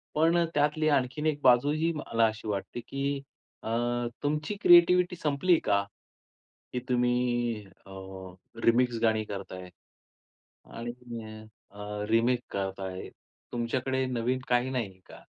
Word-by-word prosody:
पण 165 +3 +4 0.2
त्यातली 150 +1 +2
आणखीन 140 +1 0
एक 155 -2 +1
बाजूही 145 +6 +4
मला 115 -6 +1
अशी 110 0 -6
वाटते 105 +3 -3
की 140 0 -2 0.4
अ, - - -4 0.5
तुमची 150 +7 -1
क्रिएटीवीटी 180 +1 +6
संपली 165 +3 +2
का? 100 -1 +2 0.9
की 125 - 0
तुम्ही 120 -3 +1
अ, 95 +1 -18 0.7
रिमिक्स 120 0 +3
गाणी 110 -1 +2
करताय 95 -3 -7 1.1
आणि 120 +1 -4
तुम्ही 120 -2 -8 0.5
अ, 105 +1 -6
रिमेक 115 +2 +3
करता 95 0 -3
आहे. 95 0 -7 0.4
तुमच्याकडे 130 +2 -1
नवीन 125 0 -1
काही 125 +1 +2
नाही 110 -8 -3
का? - - -13
125 Hz, 120 wpm, -29 LUFS, 110-145 Hz, 1.1 s, क्रिएटीवीटी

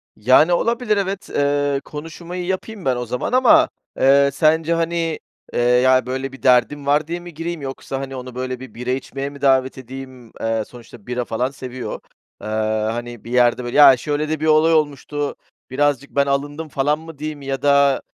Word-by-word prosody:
Yani 130 +10 +4
olabilir, 230 +2 +1
evet, 195 0 -3
eee, 145 -1 0
konuşmayı 170 +4 -7
yapayım 190 0 -4
ben 130 -2 +2
o 125 0 -3
zaman 125 - -3
ama, 315 +5 +5 0.3
eee, 140 +1 +5
sence, 160 +2 +2
hani, 165 -1 -1 0.3
eee, - - -1
"Ya, 125 +1 +4
böyle 130 +1 -3
bir 135 - -14
derdim." 135 +3 +3
var 145 +2 +2
diye 170 +1 -3
mi 175 -1 -11
gireyim 165 0 -5
yoksa, 135 0 -5
hani, 135 0 -6
onu 125 -1 -8
böyle 130 0 -4
bir 130 - -11
bira 125 +1 -6
içmeye 135 +1 -4
mi 140 -1 -13
davet 130 -1 +2
edeyim? 130 -2 -10
Eee, 115 -1 0
sonuçta 120 -3 -14
bira 125 0 -2
falan 125 +4 -2
seviyor, 130 -2 -6 0.4
eee, - - -7 0.4
hani, 120 -1 -6
"Bir 120 - -9
yerde 125 0 +3
böyle, 120 +3 -3
ya, 140 -3 +9
şöyle 150 +3 -2
de 155 -1 -1
bir 155 - -2
olay 160 +1 +4
olmuştu, 145 -1 -1 0.3
birazcık 140 0 0
ben 140 0 +3
alındım" 145 +3 -2
falan 145 +3 0
mı 160 -1 -11
diyeyim? 150 0 -6
Ya 135 -1 -4
da, 140 -1 +4
140 Hz, 185 wpm, -20 LUFS, 130-155 Hz, 0.4 s, ya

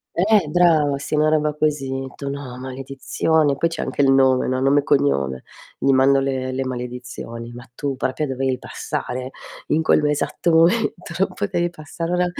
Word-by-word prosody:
Eh 200 0 +3
brava 155 -4 +3
sì, 140 - -6
una 155 +1 +3
roba 150 -1 +1
così. 135 -3 -1
Tu: 140 - -5
"No, 140 -3 -6
maledizione." 135 +3 -1
Poi 165 - +1
c'è 165 - -5
anche - - -1
il 135 -1 +4
nome, 130 -1 +4
no, 130 0 0
nome 135 +2 +4
e 145 - -2
cognome. 70 - +1 0.3
Gli 135 - +2
mando 135 +1 +4
le 130 -1 -2
le 130 +1 -2
maledizioni: 125 -2 -6
"Ma 125 +1 -11
tu 140 0 -3
proprio 130 +3 -2
dovevi 130 0 -1
passare 130 +1 -5 0.4
in 160 - +2
quello 150 -1 +3
esatto 150 +3 0
momento? 170 +8 +4 0.2
Non 195 - +1
potevi 175 -4 -1
passare 165 +1 -4
da 180 - +2
140 Hz, 175 wpm, -21 LUFS, 130-155 Hz, 0.4 s, il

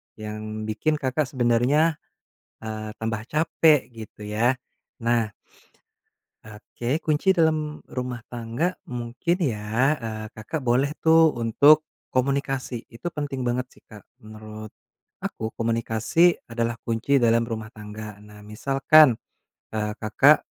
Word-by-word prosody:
yang 110 0 -6
bikin 110 +9 0
Kakak 145 0 -1
sebenarnya, 130 +6 +2 0.6
eee, 110 -1 -5
tambah 110 -1 -2
capek, 155 0 +3
gitu 110 -3 -11
ya. 110 +4 +1 0.5
Nah 115 -2 +1 1.1
oke, 120 +6 -4
kunci 155 +5 +2
dalam 155 -4 +1
rumah 125 -1 -4
tangga 120 +10 -2 0.2
mungkin 125 +8 -2
ya, 120 - +1
eee, 110 -2 -5
Kakak 110 +9 -4
boleh 130 +4 +2
tuh 160 0 +5
untuk 145 +7 +5 0.3
komunikasi. 135 -2 -1
Itu 115 +9 -5
penting 145 -3 -3
banget 125 +1 0
sih, - - -21
Kak, 105 -3 -13 0.2
menurut 110 0 -10 0.5
aku, 110 0 -4
komunikasi 115 +9 +2
adalah 115 0 -2
kunci 120 +5 +1
dalam 115 -1 +3
rumah 110 -2 -5
tangga. 105 0 -8
Nah, 105 0 -14
misalkan, 135 +4 +4 0.5
eee, 105 -1 -1
Kakak, 110 -1 +4
120 Hz, 115 wpm, -24 LUFS, 110-140 Hz, 1.1 s, tuh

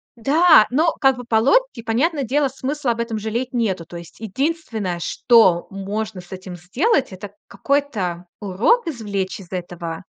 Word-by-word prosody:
Да, 295 +1 +5
но 320 +6 +2
как 270 -2 +4
бы 245 - -7
по 230 -1 -1
логике, 350 - +2
понятное 275 +7 0
дело, 280 +3 +1
смысла 270 0 -2
об 230 - -4
этом 230 -1 -2
жалеть 225 +4 -3
нету. 210 -8 -1
То 170 - -9
есть 170 -1 -12
единственное, 225 - -3
что 190 -2 +3
можно 200 +1 -4
с 175 - -19
этим 185 -1 -8
сделать- 260 - 0
это 195 +2 -9 0.2
какой-то 210 -12 -2
урок 220 - +2
извлечь 205 -10 -3
из 185 -3 -14
этого 175 -2 -6
225 Hz, 160 wpm, -21 LUFS, 190-275 Hz, 0.2 s, Да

